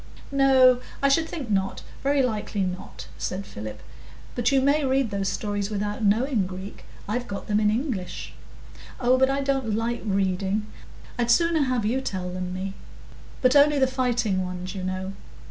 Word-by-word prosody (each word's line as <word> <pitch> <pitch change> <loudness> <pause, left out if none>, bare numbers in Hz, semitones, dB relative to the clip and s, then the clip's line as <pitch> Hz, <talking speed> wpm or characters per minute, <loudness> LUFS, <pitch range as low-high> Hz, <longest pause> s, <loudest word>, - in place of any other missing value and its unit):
"No, 260 -2 +5 0.2
I 275 - +5
should 320 +3 +2
think 275 -10 -5
not, 195 -1 0 0.2
very 280 0 +2
likely 215 -4 -1
not," 180 0 -5
said 195 +2 -3
Philip. 105 - -8 0.5
"But 240 +2 +1
you 275 - +4
may 285 +3 +3
read 265 -3 +1
those 195 -1 -1
stories 205 0 -2
without 210 +1 -2
knowing 215 0 +2
Greek. 190 +2 -8 0.2
I've 245 +4 -2
got 200 - -5
them 210 0 +1
in 210 -1 +3
English." 220 - -3 0.7
"Oh, 250 0 +4
but 265 0 +4
I 275 +1 0
don't 270 -6 0
like 235 +2 -1
reading; 195 0 0 0.5
I'd 240 -1 +1
sooner 335 +4 +4
have 250 -4 0
you 250 +5 +1
tell 185 -7 -3
them 180 0 -4
me. 190 +1 -4 0.7
But 255 +2 +5
only 290 +1 +6
the 265 - +5
fighting 245 -7 0
ones, 180 0 -5
you 195 - -5
know. 185 +1 -3
220 Hz, 170 wpm, -25 LUFS, 195-265 Hz, 0.7 s, only